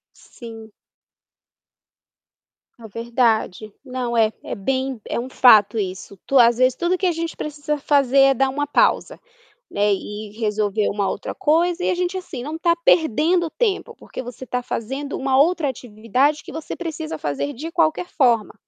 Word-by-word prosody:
Sim. 225 Hz, -3 st, -12 dB, 2.1 s
É 225 Hz, -, -10 dB
verdade, 225 Hz, -2 st, -1 dB
não 250 Hz, -2 st, -3 dB
é 220 Hz, -1 st, +4 dB
é -, -, -5 dB
bem 260 Hz, +3 st, -2 dB
é -, -, -2 dB
um 250 Hz, +2 st, -5 dB
fato 220 Hz, -5 st, +5 dB
isso, 190 Hz, 0 st, -5 dB
tu 275 Hz, -, +3 dB
às 235 Hz, -1 st, +5 dB
vezes 255 Hz, 0 st, +3 dB
tudo 345 Hz, +5 st, 0 dB
que 380 Hz, -, -2 dB
a 360 Hz, -, +3 dB
gente 330 Hz, 0 st, -4 dB
precisa 300 Hz, 0 st, -3 dB
fazer 275 Hz, -2 st, +2 dB
é 270 Hz, 0 st, +6 dB
dar 270 Hz, +1 st, +1 dB
uma 290 Hz, +2 st, -2 dB
pausa, 290 Hz, -, +1 dB, 0.5 s
né, 205 Hz, 0 st, +1 dB
e 205 Hz, +2 st, -6 dB
e 220 Hz, -, -15 dB
resolver 210 Hz, -1 st, 0 dB
uma 200 Hz, -1 st, -1 dB
outra 200 Hz, -, -4 dB
coisa 345 Hz, +3 st, +1 dB
e -, -, +1 dB
a -, -, 0 dB
gente 360 Hz, +1 st, -2 dB
assim 330 Hz, -9 st, -7 dB
não 305 Hz, +5 st, -5 dB
está 335 Hz, +1 st, +2 dB
perdendo 325 Hz, +3 st, +3 dB
tempo 465 Hz, 0 st, -1 dB
porque -, -, -8 dB
você 245 Hz, +1 st, -9 dB
está 250 Hz, 0 st, -3 dB
fazendo 270 Hz, +6 st, -4 dB
uma 265 Hz, -1 st, +1 dB
outra 320 Hz, -1 st, +2 dB
atividade 250 Hz, +5 st, -1 dB
que -, -, -10 dB
você 320 Hz, -1 st, -6 dB
precisa 320 Hz, -2 st, -5 dB
fazer 150 Hz, -, -3 dB
de 310 Hz, +6 st, -7 dB
qualquer 330 Hz, +1 st, +1 dB
forma. 235 Hz, -7 st, +2 dB
260 Hz, 170 wpm, -21 LUFS, 225-315 Hz, 2.1 s, é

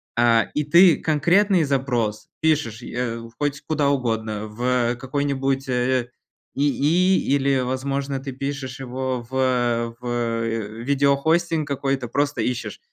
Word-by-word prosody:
а, 115 Hz, -1 st, +4 dB
и 150 Hz, -, 0 dB
ты 170 Hz, +2 st, +6 dB
конкретный 175 Hz, +4 st, +3 dB
запрос 125 Hz, -6 st, -1 dB
пишешь, 145 Hz, -8 st, 0 dB
э, 120 Hz, -1 st, -3 dB, 0.2 s
хоть 145 Hz, 0 st, -2 dB
куда 150 Hz, -2 st, +1 dB
угодно, 110 Hz, -5 st, -1 dB
в 120 Hz, +2 st, 0 dB
какой-нибудь, 135 Hz, +1 st, -1 dB
э, 125 Hz, -1 st, 0 dB, 0.5 s
ИИ 150 Hz, +5 st, +2 dB
или, 135 Hz, -1 st, +2 dB
возможно, 135 Hz, +2 st, -2 dB
ты 135 Hz, 0 st, -5 dB
пишешь 135 Hz, -1 st, -5 dB
его 130 Hz, -1 st, -3 dB
в 120 Hz, -3 st, 0 dB
в 120 Hz, -2 st, -2 dB, 0.4 s
видеохостинг 145 Hz, +4 st, +1 dB
какой-то, 135 Hz, -2 st, -1 dB
просто 140 Hz, +1 st, -1 dB
ищешь: 125 Hz, +2 st, -3 dB
135 Hz, 115 wpm, -23 LUFS, 120-145 Hz, 0.5 s, ты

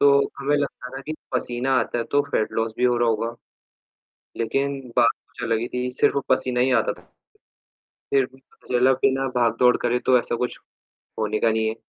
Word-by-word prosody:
तो 140 Hz, -, +6 dB, 0.3 s
हमें 145 Hz, +2 st, +1 dB
लगता 140 Hz, -3 st, -4 dB
था 135 Hz, -, -6 dB
कि 155 Hz, +3 st, -5 dB, 0.2 s
पसीना 125 Hz, +1 st, -1 dB
आता -, -, -2 dB
है, 115 Hz, -, 0 dB
तो 145 Hz, +4 st, +2 dB
फ़ैट 110 Hz, -, 0 dB
लॉस 115 Hz, 0 st, -1 dB
भी -, -, -1 dB
हो 125 Hz, -1 st, +3 dB
रहा 120 Hz, 0 st, +2 dB
होगा। 115 Hz, +1 st, -1 dB, 1.0 s
लेकिन 135 Hz, +4 st, -1 dB, 0.2 s
बात 120 Hz, -1 st, +6 dB, 0.2 s
कुछ -, -, -11 dB
अलग 115 Hz, -1 st, +1 dB
ही 120 Hz, -, -3 dB
थी, 125 Hz, 0 st, -2 dB
सिर्फ़ 125 Hz, -, +2 dB
वो 140 Hz, -, +1 dB
पसीना 130 Hz, -1 st, +1 dB
ही 130 Hz, -, +3 dB
आता -, -, -1 dB
था। -, -, -22 dB, 1.1 s
फिर 135 Hz, -1 st, +4 dB
भी 130 Hz, -, -19 dB, 0.3 s
जल 125 Hz, +1 st, +4 dB
बिना 135 Hz, 0 st, +2 dB
भाग-दौड़ 120 Hz, +1 st, +4 dB
करे 120 Hz, 0 st, 0 dB
तो 130 Hz, -, +6 dB
ऐसा 120 Hz, -, -2 dB
कुछ 125 Hz, +1 st, -3 dB, 0.6 s
होने 110 Hz, 0 st, 0 dB
का 115 Hz, 0 st, +3 dB
नहीं 110 Hz, 0 st, 0 dB
है। 110 Hz, -, -2 dB
125 Hz, 200 wpm, -23 LUFS, 115-135 Hz, 1.1 s, तो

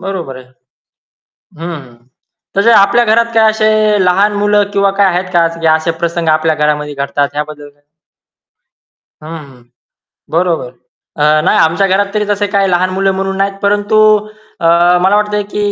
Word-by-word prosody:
बरोबर 180 Hz, -9 st, -6 dB
आहे. 130 Hz, -, -12 dB, 1.1 s
हं, 170 Hz, +1 st, -5 dB
हं. 120 Hz, -1 st, -21 dB, 0.5 s
तसे 215 Hz, +4 st, +3 dB
आपल्या 215 Hz, +4 st, +4 dB
घरात 230 Hz, +1 st, +1 dB
काय 220 Hz, -1 st, +4 dB
असे 215 Hz, 0 st, 0 dB, 0.4 s
लहान 195 Hz, +4 st, +2 dB
मुलं 205 Hz, -1 st, +1 dB
किंवा 200 Hz, -1 st, +1 dB
काय 200 Hz, -, +5 dB
आहेत 185 Hz, 0 st, -1 dB
का 170 Hz, -1 st, +3 dB
की 165 Hz, -, -1 dB
असे 160 Hz, +1 st, -1 dB
प्रसंग 170 Hz, -1 st, -2 dB
आपल्या 155 Hz, 0 st, +1 dB
घरामध्ये 150 Hz, -1 st, -2 dB
घडतात? 140 Hz, +1 st, -2 dB
याबद्दल 150 Hz, -1 st, -6 dB
काय 145 Hz, 0 st, -26 dB, 1.4 s
हं, 155 Hz, -, -10 dB, 0.2 s
हं. 125 Hz, -3 st, -18 dB, 0.7 s
बरोबर. 165 Hz, -6 st, -1 dB, 0.5 s
अ, 155 Hz, +1 st, +3 dB
नाही, -, -, +2 dB
आमच्या 165 Hz, +5 st, +2 dB
घरात 200 Hz, +2 st, 0 dB
तरी 210 Hz, 0 st, -1 dB
तसे 205 Hz, 0 st, -1 dB
काही 200 Hz, -1 st, 0 dB
लहान 180 Hz, +1 st, +1 dB
मुलं 195 Hz, +1 st, 0 dB
म्हणून 195 Hz, 0 st, -3 dB
नाहीत. 195 Hz, 0 st, -1 dB
परंतु 205 Hz, +1 st, +1 dB, 0.6 s
अ, 165 Hz, -, -3 dB, 0.4 s
मला 190 Hz, +2 st, +2 dB
वाटतयं, 210 Hz, 0 st, 0 dB
की 205 Hz, 0 st, -2 dB
190 Hz, 160 wpm, -12 LUFS, 155-205 Hz, 1.4 s, काय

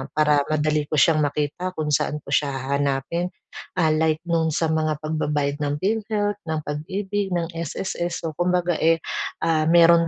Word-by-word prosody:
para 150 Hz, -1 st, +4 dB
madali 155 Hz, 0 st, +1 dB
ko -, -, -7 dB
siyang 160 Hz, +1 st, +5 dB
makita 150 Hz, +5 st, -1 dB
kung 155 Hz, -1 st, -2 dB
saan 150 Hz, +1 st, +1 dB
ko -, -, -12 dB
siya 145 Hz, -1 st, +2 dB
hahanapin, 140 Hz, +5 st, -1 dB, 0.5 s
ah, 160 Hz, -2 st, +4 dB
like 155 Hz, 0 st, +2 dB
nung 165 Hz, -1 st, +1 dB
sa 165 Hz, -, +1 dB
mga 155 Hz, -1 st, 0 dB
pagbabayad 150 Hz, -2 st, -1 dB
ng 145 Hz, 0 st, 0 dB
Philhealth, 205 Hz, -1 st, 0 dB
ng 160 Hz, -1 st, -1 dB
Pag-ibig, 190 Hz, +7 st, -3 dB
ng 170 Hz, -1 st, 0 dB
SSS 170 Hz, +2 st, -3 dB
so 160 Hz, -, -2 dB
kumbaga, 180 Hz, 0 st, +2 dB
eh, 165 Hz, 0 st, +4 dB, 0.4 s
ah, 160 Hz, -1 st, +2 dB
meron 170 Hz, 0 st, +6 dB
160 Hz, 160 wpm, -23 LUFS, 150-175 Hz, 0.5 s, meron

